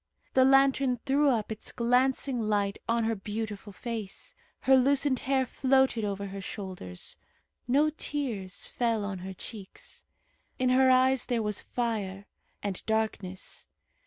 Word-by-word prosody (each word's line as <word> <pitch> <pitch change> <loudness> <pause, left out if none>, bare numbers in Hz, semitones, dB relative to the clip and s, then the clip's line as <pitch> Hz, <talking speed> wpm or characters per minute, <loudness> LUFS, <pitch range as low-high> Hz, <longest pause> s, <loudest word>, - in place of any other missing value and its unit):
The 260 0 +6
lantern 270 -2 +4
threw 285 +1 +4
up 225 -4 0
its 215 - -5
glancing 250 +2 +2
light 205 -2 0
on 230 0 +2
her 225 0 +1
beautiful 210 0 -5
face. 220 -1 -5 0.3
Her 265 - +5
loosened 270 0 +3
hair 265 -1 +3
floated 265 -2 +2
over 200 -1 -2
her 195 0 -6
shoulders. 185 - -7 0.5
No 290 +5 +3
tears 240 -12 -3
fell 230 -4 0
on 195 -2 -4
her 190 +1 -6
cheeks. 200 -1 -10 0.5
In 255 0 +2
her 260 +1 +5
eyes 260 0 +4
there 235 -3 0
was 210 -2 -2
fire, 205 -5 -3 0.4
and 200 -3 -3
darkness. 215 -4 -2
230 Hz, 135 wpm, -29 LUFS, 200-260 Hz, 0.5 s, The